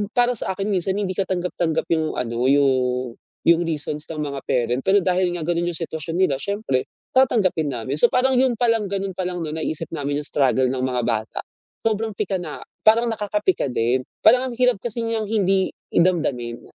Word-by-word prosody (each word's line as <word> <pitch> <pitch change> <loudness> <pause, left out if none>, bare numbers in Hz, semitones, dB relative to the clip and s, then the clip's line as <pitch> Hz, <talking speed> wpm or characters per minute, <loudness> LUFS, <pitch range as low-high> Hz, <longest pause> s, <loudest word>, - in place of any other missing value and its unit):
para 245 0 +4
sakin, 195 -3 -2
minsan 190 0 0
hindi 200 -2 -1
katanggap-tanggap 180 -3 -1
'yung 160 -1 +1
ano, 120 +1 -1
yung, 130 -3 +2 0.3
yung 170 0 +5
reasons 150 -1 -3
ng 155 -2 -3
mga 140 -2 -4
parent. 125 +1 +1
Pero 195 +3 +3
dahil 180 -1 +1
nga 170 - -4
ganun 175 +1 0
'yung 165 - +1
sitwasyon 160 -1 -5
nila, 185 -7 +3
syempre 200 -11 -1 0.3
tatanggapin 210 - +3
namin. 120 +4 -3
So - - +6
parang 260 +1 +2
'yun 255 -2 +3
palang, 230 -3 +2
ganon 195 0 -2
palang 180 -2 -2
'no, 155 - -4
naiisip 160 0 -3
namin 145 -2 -2
'yung - - -2
struggle 130 -2 +2
ng 130 -1 -2
mga 125 -1 0
bata. 110 -1 -2 0.5
Sobrang 220 0 0
pika 195 -2 -1
na, 155 -4 -7 0.2
parang 225 +2 +5
nakakapika 210 - 0
din. 120 +1 +1 0.2
Parang 250 +3 +6
ang - - -7
hirap 250 -3 +3
kasi 235 0 -3
niyang 225 -2 -2
hindi 195 -3 +2 0.2
damdamin. 140 -10 +1
175 Hz, 180 wpm, -22 LUFS, 140-210 Hz, 0.5 s, So